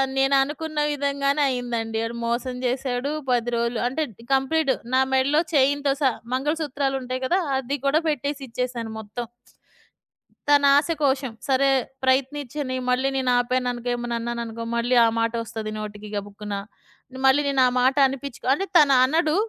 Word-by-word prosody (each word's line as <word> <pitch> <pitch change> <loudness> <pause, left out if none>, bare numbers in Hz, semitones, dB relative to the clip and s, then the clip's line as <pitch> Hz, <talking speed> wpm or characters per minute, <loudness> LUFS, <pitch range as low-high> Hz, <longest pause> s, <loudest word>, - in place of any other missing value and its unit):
నేననుకున్న 280 +3 +1
విధంగానే 280 0 0
అయిందండి. 235 -3 -2
ఆడు 230 +1 -5
మోసం 240 +2 -2
జేశాడు. 255 +2 -1 0.2
10 240 -1 +1
రోలు 235 0 -1
అంటే, 310 +5 -1
డి 230 - -15
కంప్లీటు 270 +1 +1 0.2
నా 260 - +5
మెడలో 275 +4 +3
చైన్‌తో 280 0 +3
సహా 260 -4 +3 0.2
మంగళసూత్రాలుంటాయి 270 -3 -2
గదా! 355 +8 +2 0.2
అది 270 +2 -3
కూడా 285 +3 +3
పెట్టేసిచ్చేశాను 255 -5 -3
మొత్తం. 220 +3 -6 1.2
తన 290 0 +5
ఆస 295 - +1
కోశం. 265 -3 +1 0.2
సరే. 275 0 +3 0.3
ప్రయత్నిచ్చని 265 +1 0
మళ్ళీ 260 +2 +2
నేనాపాననుకో, 245 -1 0
ఏమన్నా 240 0 -3
అన్నాననుకో, 230 -1 -4
మళ్ళీ 240 +2 +1
ఆ - - +4
మాటొస్తది 230 -1 -2
నోటికి 210 0 -7
గబుక్కున. 205 0 -5 0.7
మళ్ళీ 265 +2 +5
నేను 275 -2 +2
ఆ - - +3
మాట 260 +1 +3
అనిపిచ్చుకో 270 -1 -7
అంటే 390 +8 -1
తను 285 -3 +6
అనడు. 310 +3 +2
260 Hz, 130 wpm, -24 LUFS, 240-280 Hz, 1.2 s, తను